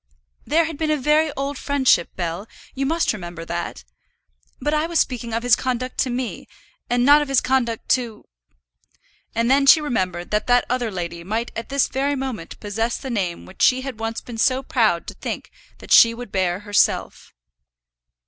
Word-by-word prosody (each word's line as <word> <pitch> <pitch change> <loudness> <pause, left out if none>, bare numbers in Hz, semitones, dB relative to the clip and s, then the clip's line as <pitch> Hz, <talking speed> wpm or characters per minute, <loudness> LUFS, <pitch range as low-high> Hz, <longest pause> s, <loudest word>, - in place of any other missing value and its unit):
"There 330 +2 +3
had 320 -2 -6
been 315 -1 0
a 305 - +2
very 300 +3 +2
old 275 0 -3
friendship, 265 -11 +2
Bell; 175 +4 -4 0.3
you 270 0 -2
must 330 -2 +1
remember 175 -4 -7
that. 170 - -5 0.8
But 295 - -1
I 305 +1 +1
was 340 -1 -1
speaking 240 -2 -1
of 230 +1 -2
his 245 -2 +5
conduct 255 0 -3
to 260 - +2
me, 250 0 -4 0.4
and 245 0 +2
not 290 +2 +7
of 295 - -2
his 275 -2 +3
conduct 245 -4 -1
to 235 -4 0 0.6
" - - -38
And 230 +2 +1
then 275 +1 +4
she 315 - +9
remembered 185 - -2
that 210 0 0
that 245 0 +4
other 245 -2 0
lady 170 -3 -5
might 220 +6 -3
at 230 - -5
this 275 -1 +2
very 275 +2 -1
moment 260 -11 -5
possess 225 +3 -2
the 265 - -6
name 185 -7 -2
which 190 - -12
she 255 0 +4
had 260 -4 -7
once 225 0 -3
been 235 -2 -8
so 260 +2 +2
proud 220 -10 +1
to - - -7
think - - -6 0.3
that - - -13
she 230 0 +7
would 245 -3 -9
bear 185 0 0
herself. 205 0 0
245 Hz, 190 wpm, -22 LUFS, 210-275 Hz, 0.8 s, she